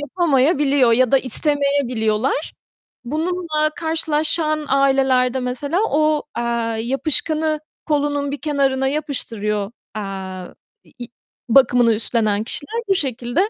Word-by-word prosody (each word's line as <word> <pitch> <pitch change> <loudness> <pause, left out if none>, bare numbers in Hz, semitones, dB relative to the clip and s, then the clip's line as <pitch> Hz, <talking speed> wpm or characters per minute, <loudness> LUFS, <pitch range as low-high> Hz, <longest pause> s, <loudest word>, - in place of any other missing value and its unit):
yapamayabiliyor 285 -5 +2
ya 255 +2 +2
da 270 - +6
istemeyebiliyorlar. 270 -3 0 0.5
Bununla 310 +2 -1
karşılaşan 315 -1 0
ailelerde 265 -2 +2
mesela 270 +7 -2
o, 305 0 +1
eee, 235 - -1 0.4
yapışkanı 310 +4 0 0.3
kolunun 290 -1 0
bir 290 - -6
kenarına 275 -3 0
yapıştırıyor, 225 -8 -2 0.2
eee, 190 -3 -6 0.4
i 240 - -6 0.4
bakımını 245 -2 +5
üstlenen 215 -1 0
kişiler 440 - -3
bu 390 - +4
şekilde 265 - 0
275 Hz, 100 wpm, -20 LUFS, 245-305 Hz, 0.5 s, da